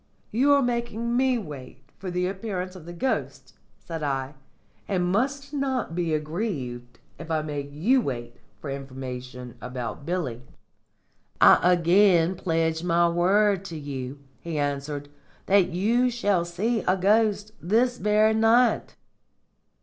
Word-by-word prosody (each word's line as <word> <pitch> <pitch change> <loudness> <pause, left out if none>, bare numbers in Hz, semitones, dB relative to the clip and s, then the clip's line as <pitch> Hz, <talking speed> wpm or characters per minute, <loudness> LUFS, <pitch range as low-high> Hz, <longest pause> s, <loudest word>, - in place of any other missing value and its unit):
"You 265 +6 +3
are 280 -1 +4
making 235 -1 -1
me 260 0 +3
wait 140 - -9 0.2
for 185 0 -5
the 180 0 -1
appearance 190 -1 -4
of 170 -3 -11
the - - -6
ghost," 215 +10 -3 0.2
said 165 -2 -7
I, 135 -1 -2 0.5
"and 185 -3 0
must 275 +9 -1
not 265 - -1
be 170 -1 -1
aggrieved 145 - -4 0.2
if 160 - -9
I 155 -1 0
make 145 -2 -4
you 220 - +2
wait 120 - -5 0.2
for 135 - -6
information 130 -2 -7
about 125 +1 -5
Billy." 150 -8 -3 1.0
"I 180 +1 +6
again 175 0 +4
pledge 165 -2 0
my 170 -1 +3
word 195 +3 +2
to 170 -4 -6
you," 140 -2 -6 0.2
he 165 -2 -5
answered, 145 0 -2 0.4
"that 195 -2 +4
you 230 +8 +2
shall 205 -7 +1
see 210 +7 -1
a 185 +1 +3
ghost 210 +2 +2
this 240 +7 +1
very 215 +1 +3
night." 225 +2 +3
180 Hz, 135 wpm, -25 LUFS, 145-215 Hz, 1.0 s, I